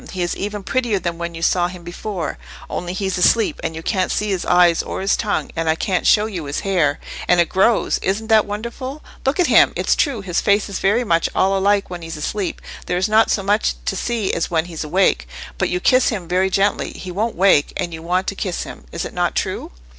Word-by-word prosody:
He 185 -2 -1
is 175 - -2
even 205 0 -4
prettier 235 0 0
than 170 -2 -3
when 170 0 -4
you 165 - -6
saw 175 +1 +2
him 180 -1 -10
before—only 175 -1 -6
he's 190 -1 -2
asleep, 225 +4 +3
and 165 -1 -3
you 160 - -7
can't 185 -2 0
see 210 - -1
his 185 -2 -1
eyes 175 -2 +5
or - - -5
his 195 +1 +2
tongue, 210 -2 -2
and 165 -1 -1
I 160 - +3
can't 180 +2 -1
show 210 0 +5
you 185 -8 -5
his 140 0 -3
hair—and 175 -1 0
it 170 - +3
grows—isn't 205 0 +1
that 220 -2 +4
wonderful? 235 +7 -6 0.2
Look 280 +6 +1
at 360 - +5
him! - - +5
It's - - +1
true 275 -8 0
his 180 -3 -1
face 205 0 +2
is 200 - -4
very 210 +6 +2
much 170 -7 +1
all 195 +1 +3
alike 200 0 +1
when 175 -1 -6
he's 165 -1 -6
asleep, 190 +5 -3 0.2
there 180 - 0
is 185 - +1
not 220 +1 +4
so 195 - +1
much 205 +2 +1
to - - -1
see 225 -1 -1
as 170 - -1
when 160 -1 +1
he's 165 -3 -6
awake. 155 - +1 0.3
If - - +1
you 180 - -1
kiss 255 +7 +4
him 190 -7 -4
very 185 +2 +1
gently, 195 +2 0
he 185 - -7
won't 220 +5 -2
wake: 185 -5 +4
you 170 -3 -3
want 180 +3 0
to 200 - -3
kiss 185 -3 -3
him, - - -10
is - - -4
it - - -7
not - - 0
true?" - - -2
190 Hz, 230 wpm, -20 LUFS, 175-210 Hz, 0.3 s, eyes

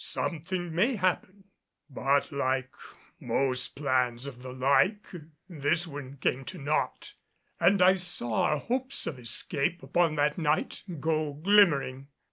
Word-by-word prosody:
Something 165 +5 -3
may 220 +10 +2
happen." 185 0 -1 0.4
But 140 0 0
like 130 -2 -1 0.5
most 130 -2 0
plans 130 -3 0
of 130 -3 -8
the 130 0 -8
like, 140 +11 +2 0.4
this 165 0 0
one 140 -3 -8
came 135 0 -1
to - - -7
naught; 145 +2 -2 0.5
and 180 +2 +4
I 185 +1 +7
saw 175 -11 -2
our 150 - +1
hopes 260 - -1
of 130 - -5
escape 140 +7 -1
upon 170 -3 +1
that 150 +2 +1
night 155 -1 0 0.2
go 155 0 -1
glimmering. 145 -6 +3
150 Hz, 130 wpm, -28 LUFS, 135-175 Hz, 0.5 s, I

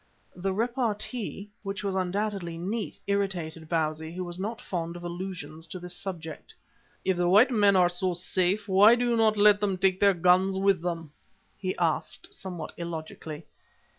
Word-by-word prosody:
The 190 +2 -2
repartee, 220 -1 -2
which 195 0 -4
was 200 -1 -1
undoubtedly 190 -2 -2
neat, 205 +6 -3
irritated 175 -6 -2
Bausi, 160 -1 -1
who 185 - -3
was 175 0 -5
not 220 +4 -3
fond 170 -5 -4
of 175 - -8
allusions 170 -3 -6
to 185 - -7
this 180 0 -6
subject. 165 -5 -6 0.5
"If 190 -2 +2
the 175 0 +2
white 220 +8 +6
men 205 -4 +4
are 180 -1 +6
so 175 +1 -1
safe, 185 +3 0
why 205 +4 +7
do 245 0 0
you 240 - +2
not 220 -2 +3
let 205 0 +6
them 200 -2 0
take 190 0 +2
their 200 -1 +5
guns 180 +2 +3
with 195 -2 +3
them?" 165 -3 -4 0.4
he 185 -1 -3
asked, 165 -3 -1
somewhat 180 -5 -6
illogically. 160 -2 -6
185 Hz, 165 wpm, -28 LUFS, 175-200 Hz, 0.5 s, why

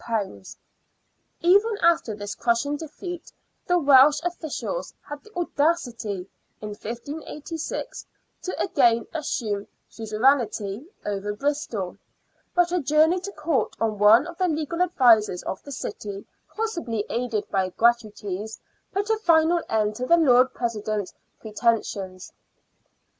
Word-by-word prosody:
Even 405 +5 +4
after 330 -10 +3
this 205 0 -5
crushing 235 +6 0
defeat, 335 +3 -7 0.4
the 355 -1 +3
Welsh 285 -2 +6
officials 350 - -4
had 290 0 -7
the 430 - -17
audacity 255 - -1 0.3
in 210 - -6
1586 290 - -6 0.3
to 370 - -5
again 235 - +3
assume 215 -10 -2 0.2
suzerainty 220 0 0 0.2
over 205 0 -2
Bristol; 235 -8 -2 0.6
but 355 -1 +3
a 360 -1 +1
journey 310 +5 +3
to 390 +3 -6
Court 305 -2 -1
of 215 -2 -1
one 220 +6 +7
of 345 0 -9
the 370 - +3
legal 320 +1 -2
advisers 235 - +4
of 190 - -4
the 285 - -11
city, 200 -6 -6 0.3
possibly 335 - -2
aided 235 -3 -2
by 190 -1 +1
" - - -39
gratuities," 220 -3 0 0.3
put 400 +1 -1
a 445 - +2
final 335 -3 +3
end 215 -1 +1
to 255 - -3
the 340 - +6
Lord 255 -5 +5
President's 215 -4 -2 0.3
pretensions. 210 -4 -2
255 Hz, 120 wpm, -25 LUFS, 215-330 Hz, 0.6 s, one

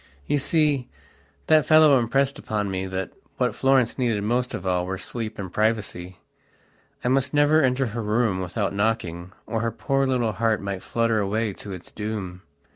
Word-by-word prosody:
You 145 - +1
see, 145 -3 +1 0.6
that 155 -2 +4
fellow 155 -4 +7
impressed 135 +4 0
upon 105 -2 -2
me 95 0 -3
that 95 0 -4 0.3
what - - +1
Florence 135 -2 +2
needed 115 -5 0
most 125 +3 0
of 90 - -7
all 90 -1 +1
were 95 +1 -3
sleep 110 +3 -6
and 95 -3 -6
privacy. 105 -5 -1 0.9
I - - 0
must 135 +2 +1
never 145 +2 +5
enter 130 0 +2
her 115 0 -4
room 105 -2 +1
without 100 +2 -2
knocking, 100 -5 -1
or 115 - -2
her 115 - 0
poor 135 +3 0
little 125 -4 +1
heart 110 0 +1
might 100 -1 -4
flutter 115 0 0
away 105 +1 -1
to 100 - -9
its 90 -2 -9
doom. 105 -4 -5
110 Hz, 175 wpm, -24 LUFS, 100-130 Hz, 0.9 s, fellow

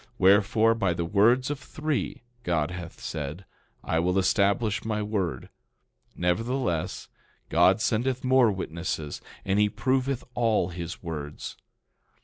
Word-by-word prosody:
Wherefore, 105 +4 +5
by 95 -6 0
the 85 - -2
words 120 +9 +3
of 145 - -3
three, 150 -3 -3 0.2
God 85 -7 0
hath 90 -2 -8
said, 80 +4 -5 0.4
I 80 - 0
will 90 +3 +1
establish 100 +2 +2
my 105 -2 -1
word. 95 -11 -2 0.7
Nevertheless, 90 0 -1 0.4
God 90 +5 +4
sendeth 125 +4 0
more 130 -3 +5
witnesses, 85 -4 -4 0.2
and 100 +1 +2
he 105 0 +4
proveth 130 +4 0
all 115 -7 +2
his 85 0 -6
words. 75 -3 -6
100 Hz, 125 wpm, -27 LUFS, 85-115 Hz, 0.7 s, Wherefore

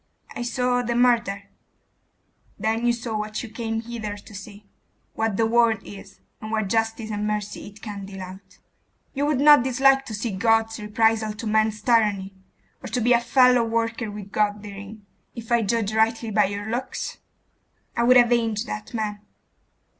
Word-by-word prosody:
'I - - -4
saw 245 +1 0
the 240 -1 -2
murder 235 -5 +2 0.6
' - - -41
'Then 225 +2 0
you - - +5
saw 235 -1 -4
what 215 +1 -3
you 240 - -7
came 225 0 -3
hither 225 -3 -6
to 205 - -14
see; 205 +1 -10 0.5
what 220 -3 -1
the 225 - +3
world 230 0 +3
is, 195 -1 -12 0.2
and 215 - -6
what 215 -3 -1
justice 225 0 -1
and 210 0 -2
mercy 210 -1 -4
it 205 +1 -14
can 200 -3 -6
deal 195 -1 -8
out. 185 +2 -12 0.6
You 285 +1 0
would 295 -3 +1
not 295 -3 +7
dislike 270 +1 +3
to 220 - -4
see 220 +2 -3
God's 225 +2 +1
reprisals 220 0 +1
to 215 - -7
man's 215 0 +1
tyranny?.... 210 -5 +2 0.5
Or - - -5
to 250 - -2
be 245 +1 +3
a 235 - +5
fellow 250 -1 +4
worker 230 0 -1
with 205 -1 -9
God 210 0 0
therein, 200 +1 -10 0.3
if 230 0 -9
I 235 -1 +4
judge 215 0 0
rightly 225 +1 +1
by 210 0 +4
your 205 +2 -4
looks?' 240 +4 -4 0.8
'I 235 - +1
would 255 +1 +7
avenge 235 -3 +3
that 105 - -6
man. 210 -2 -3
225 Hz, 175 wpm, -24 LUFS, 210-235 Hz, 0.8 s, not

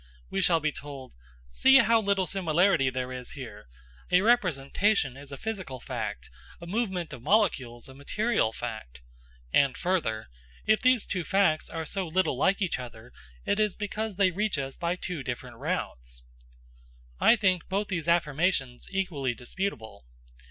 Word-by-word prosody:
We 195 - 0
shall 170 -3 +4
be 155 0 0
told: 140 -3 -9 0.3
"See 265 - +6
how 230 -3 +5
little 200 -2 +1
similarity 175 -5 +2
there 130 0 -3
is 125 -1 -7
here! 110 - -9 0.4
A 180 +1 +5
representation 185 - +2
is 140 +1 -11
a 140 - -6
physical 190 -12 -5
fact, - - -5 0.3
a 170 - -9
movement 190 -4 -2
of 125 - -8
molecules 130 - +1
a 135 - -12
material 140 - 0
fact." 110 - -7 0.5
And 140 -2 +3
further, 160 - -1 0.4
"If 215 0 +3
these 255 -3 +4
two 180 -3 -2
facts 190 -4 +2
are 165 -1 -4
so 190 +2 -2
little 180 -3 +1
like 195 +9 +2
each 175 -7 -1
other, 120 -1 -10 0.3
it 200 - +1
is 210 -3 +1
because 215 0 -3
they 190 -1 +3
reach 205 0 -1
us 135 -1 -4
by 170 +1 -1
two 180 -4 -5
different 125 -1 -6
routes." - - -4 1.0
I - - +6
think 185 -6 +1
both 200 +2 0
these 170 -4 -2
affirmations 155 -5 +1
equally 160 -11 -1
disputable. 120 - -5
170 Hz, 155 wpm, -28 LUFS, 130-195 Hz, 1.0 s, See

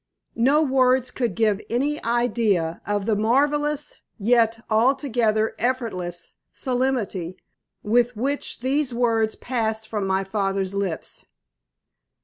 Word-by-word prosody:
No 285 +6 +4
words 255 -2 +2
could 240 -3 -2
give 215 -3 +2
any 285 +6 -1
idea 225 -8 +1
of 205 -1 -1
the 220 -1 +2
marvellous 290 +7 +1 0.2
yet 230 +1 +2
altogether 225 -2 +2
effortless 185 -9 -2 0.2
solemnity 245 -9 -2 0.5
with 240 +2 +2
which 275 +1 -2
these 265 0 0
words 225 -2 +1
passed 220 -3 -2
from 210 -3 -2
my 190 0 +1
father's 195 -1 -1
lips. 195 -5 -4
230 Hz, 110 wpm, -23 LUFS, 205-255 Hz, 0.5 s, No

